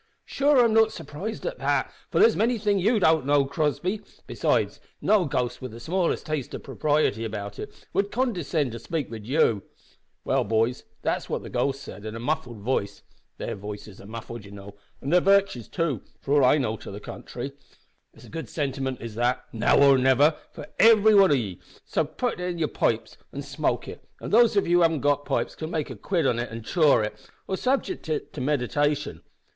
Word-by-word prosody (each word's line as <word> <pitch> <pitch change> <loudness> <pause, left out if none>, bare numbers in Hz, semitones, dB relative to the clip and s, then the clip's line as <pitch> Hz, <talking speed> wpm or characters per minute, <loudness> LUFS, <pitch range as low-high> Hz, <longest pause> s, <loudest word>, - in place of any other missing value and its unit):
"Sure, 285 +1 +2
I'm 225 - +2
not 220 0 +5
surprised 165 +8 -6
at - - -4
that - - 0 0.2
for - - -2
there's 445 +2 +6
many 235 +2 +2
things 205 -2 +1
ye 220 +5 +3
don't 160 -6 +4
know, 140 0 +3
Crossby; 155 +8 -1 0.2
besides, - - 0 0.2
no 210 -4 +3
ghost 125 -3 -2
with 130 -3 -7
the 115 - -9
smallest 175 +8 -1
taste 155 -4 -3
of - - -8
propriety 145 -5 0
about 105 -2 -5
it - - -9
would 200 0 +1
condescind 175 - 0
to 115 - -6
spake 155 +1 -4
wid 110 -2 -8
you. 120 -7 +2 0.6
Well, - - +2
boys, 115 +3 0 0.2
that's - - -1
what - - -2
the - - -9
ghost 135 0 -1
said 100 - -10
in 110 0 -6
a - - -5
muffled 120 -4 -3
vice 100 -3 -2 0.3
their - - -4
vices 105 0 -8
are 100 - -12
muffled, 115 0 -7
you 100 - -12
know, 100 0 -11 0.3
an 140 - -3
their 180 +1 +5
virtues 195 - +3
too, 160 - -1 0.2
for 140 - -2
all 145 -3 +5
I 150 - +5
know 110 -6 -1
to - - -10
the 100 - -7
contrairy. - - -7 0.6
It's - - -15
a - - -14
good 165 0 -6
sentiment 135 -3 -3
is 115 -2 -6
that 120 +3 0
`Now 115 - +3
or 140 -1 +6
niver' 135 +4 +4 0.2
for - - -9
every 220 0 +7
wan 195 -2 +7
of 145 - +4
ye 100 -8 -4 0.3
so - - 0
ye - - 0
may 155 - -23
putt 245 -7 -1
it 180 - -3
in 175 - -4
yer 165 - +1
pipes - - -1
an' - - -6
smoke - - -2
it, - - -9 0.2
an' - - -6
those 230 -1 +5
of 200 - +3
ye 170 - +1
who 175 - +5
haven't 165 -4 +3
got 145 0 +1
pipes - - -1
can 155 - -6
make 155 -4 -2
a - - -6
quid 165 - -1
of 120 -3 +2
it 120 - -3
an' 115 0 -7
chaw 150 0 +4
it, 105 0 -2 0.3
or 190 - -1
subject 265 - -1
it 155 - -3
to 145 - -5
meditation. 145 +2 0
145 Hz, 215 wpm, -26 LUFS, 115-180 Hz, 0.6 s, every